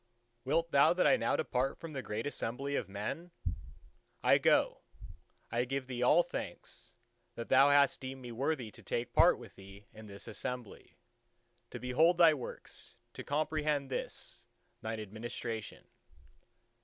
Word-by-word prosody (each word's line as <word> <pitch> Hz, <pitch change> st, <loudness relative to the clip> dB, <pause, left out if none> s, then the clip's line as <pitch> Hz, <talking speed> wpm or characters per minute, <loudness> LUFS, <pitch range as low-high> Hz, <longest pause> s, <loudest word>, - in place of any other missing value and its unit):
Wilt 165 Hz, +4 st, +1 dB
Thou 140 Hz, +3 st, +6 dB
that 180 Hz, -, +2 dB
I -, -, +6 dB
now 255 Hz, -, +1 dB
depart 130 Hz, +2 st, 0 dB
from 165 Hz, -2 st, -8 dB
the 135 Hz, -, -3 dB
great 110 Hz, -2 st, -4 dB
Assembly 140 Hz, 0 st, -3 dB
of 100 Hz, -, -2 dB
men? 105 Hz, -, -4 dB, 0.9 s
I -, -, +6 dB
go: -, -, +3 dB, 0.7 s
I 120 Hz, +1 st, +1 dB
give 135 Hz, +1 st, -3 dB
Thee 125 Hz, -1 st, -5 dB
all 150 Hz, +8 st, +6 dB
thanks, 175 Hz, -, -7 dB, 0.4 s
that 115 Hz, -, -6 dB
Thou 135 Hz, +2 st, +7 dB
hast 140 Hz, -1 st, +4 dB
deemed 130 Hz, 0 st, -6 dB
me 120 Hz, -, -7 dB
worthy 130 Hz, -1 st, -2 dB
to -, -, -13 dB
take 120 Hz, 0 st, -3 dB
part -, -, +6 dB
with -, -, -12 dB
Thee 95 Hz, +1 st, -13 dB
in 110 Hz, 0 st, -11 dB
this 100 Hz, +2 st, -8 dB
Assembly: 120 Hz, +1 st, -6 dB, 0.7 s
to -, -, -6 dB
behold 155 Hz, +8 st, +3 dB
Thy 165 Hz, -3 st, +7 dB
works, 130 Hz, -5 st, -7 dB, 0.2 s
to -, -, -7 dB
comprehend 150 Hz, -2 st, 0 dB
this -, -, -4 dB, 0.4 s
Thine 110 Hz, 0 st, -4 dB
administration." 110 Hz, 0 st, -6 dB
130 Hz, 150 wpm, -33 LUFS, 115-145 Hz, 0.9 s, Thou